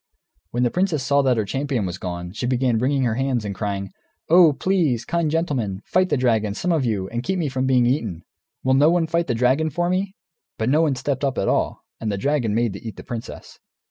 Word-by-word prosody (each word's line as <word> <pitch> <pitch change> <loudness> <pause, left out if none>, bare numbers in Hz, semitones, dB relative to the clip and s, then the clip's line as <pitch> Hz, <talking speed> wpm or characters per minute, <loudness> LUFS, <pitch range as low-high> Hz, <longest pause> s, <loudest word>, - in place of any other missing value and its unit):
When 120 +1 -1
the 120 - +2
princess 180 -6 0
saw 140 +1 +3
that 130 -3 +2
her 110 - 0
champion 135 0 -2
was 90 0 -5
gone, 90 -1 -5
she 115 +5 -3
began 125 -2 +1
wringing 135 +2 +1
her 120 -3 +1
hands, 130 -2 -1
and 100 - -3
crying, 100 -1 -3 0.4
"Oh, 170 -1 +7
please, 150 -7 0
kind 170 -2 0
gentlemen, 130 - -1
fight 185 0 +2
the - - +2
dragon, 110 -5 +1
some 180 +10 -1
of 160 -5 +2
you, 100 -5 -1
and 120 0 -3
keep 190 +8 -2
me 160 -5 -1
from 130 0 -1
being 125 -2 +4
eaten! 110 - -1 0.4
Will 130 - +2
no 145 +4 +5
one 170 -1 +2
fight 170 +1 0
the 120 - 0
dragon 130 +7 +2
for 175 +4 -1
me?" 190 +1 -1 0.4
But 110 +2 0
no 150 +4 +4
one 150 -4 +2
stepped 135 +2 -2
up, 135 -3 0
at - - 0
all. - - 0 0.2
And 110 -2 -2
the 100 - -2
dragon 120 -3 0
made 115 -3 +1
to 100 - -8
eat 110 -2 -7
the - - -9
princess. 120 0 -8
130 Hz, 235 wpm, -22 LUFS, 110-155 Hz, 0.4 s, Oh